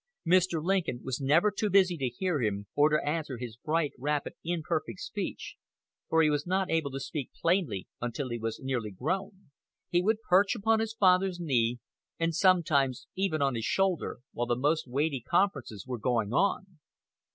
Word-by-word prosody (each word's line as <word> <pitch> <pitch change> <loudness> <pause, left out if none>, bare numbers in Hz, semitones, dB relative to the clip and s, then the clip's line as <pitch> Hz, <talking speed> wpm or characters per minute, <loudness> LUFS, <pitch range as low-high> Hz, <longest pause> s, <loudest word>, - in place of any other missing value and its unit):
Mr. 175 -2 +3
Lincoln 175 -9 0
was 130 +1 -3
never 150 +10 +4
too 205 +1 -1
busy 190 -2 +4
to 135 -5 -1
hear 160 +4 -1
him, 100 -2 -1
or 145 +1 +4
to 150 -1 0
answer 150 -4 -2
his 120 -2 -7
bright, 155 +3 -1
rapid, 145 +2 -1
imperfect 165 0 -2
speech, 205 -4 -5 0.5
for 160 0 +4
he 155 - +4
was 145 +2 -1
not 190 +1 0
able 160 -3 +1
to 135 0 -5
speak 140 -1 -4
plainly 165 - 0
until 120 +3 -3
he 120 0 -3
was 115 0 -3
nearly 130 -5 -2
grown. 185 - -4 0.4
"He 175 - +2
would 220 +3 0
perch 195 +5 +4
upon 225 0 +2
his 220 0 -2
father's 185 -2 +3
knee, 125 -7 +1 0.4
and 165 0 +1
sometimes 155 -8 +2
even 185 -6 0
on 135 -1 +2
his 115 -2 -3
shoulder, 190 -9 0
while 120 0 -2
the 120 - +1
most 145 +4 0
weighty 140 +1 -1
conferences 140 - 0
were 125 -2 -4
going 115 -2 0
on. 190 -1 0
155 Hz, 175 wpm, -29 LUFS, 130-185 Hz, 0.5 s, never